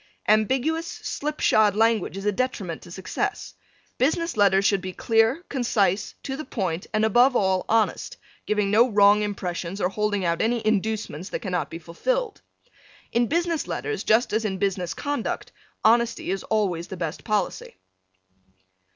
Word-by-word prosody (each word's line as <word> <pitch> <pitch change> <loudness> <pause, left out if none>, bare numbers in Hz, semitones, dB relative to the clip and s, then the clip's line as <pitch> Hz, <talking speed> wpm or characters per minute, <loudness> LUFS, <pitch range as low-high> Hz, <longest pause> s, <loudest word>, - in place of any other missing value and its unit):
Ambiguous, 265 +10 +2
slip 300 -2 -5
shod 210 -2 +4
language 220 -3 +1
is 195 - -6
a 210 - +3
detriment 200 -7 -3
to 175 - -13
success. 185 +2 -4 0.5
Business 335 +6 +1
letters 200 -2 +4
should 200 -2 +3
be 185 0 -6
clear, 225 - +2
concise, 210 -7 0
to 265 - -4
the 310 - -5
point 185 - -3
and, 215 0 +2
above 245 +4 +4
all, 190 -3 +1
honest, 225 - 0 0.3
giving 210 -2 +1
no 235 +4 +5
wrong 205 -1 +5
impressions 185 -3 -4
or 180 - +1
holding 205 -1 -1
out 170 -1 0
any 230 0 0
inducements 215 -5 -1
that - - -4
cannot 180 -3 -2
be 165 - -6
fulfilled. 430 - -2 0.7
In 235 0 +2
business 335 +1 0
letters, 435 -1 -3
just 220 +2 +2
as 220 +1 +1
in 195 -3 -2
business 185 -2 -1
conduct, 285 -5 -3 0.3
honesty 230 -3 +3
is 195 - -2
always 185 -6 0
the 190 - -7
best 165 -1 -4
policy. 210 - -2
215 Hz, 155 wpm, -24 LUFS, 190-240 Hz, 0.7 s, no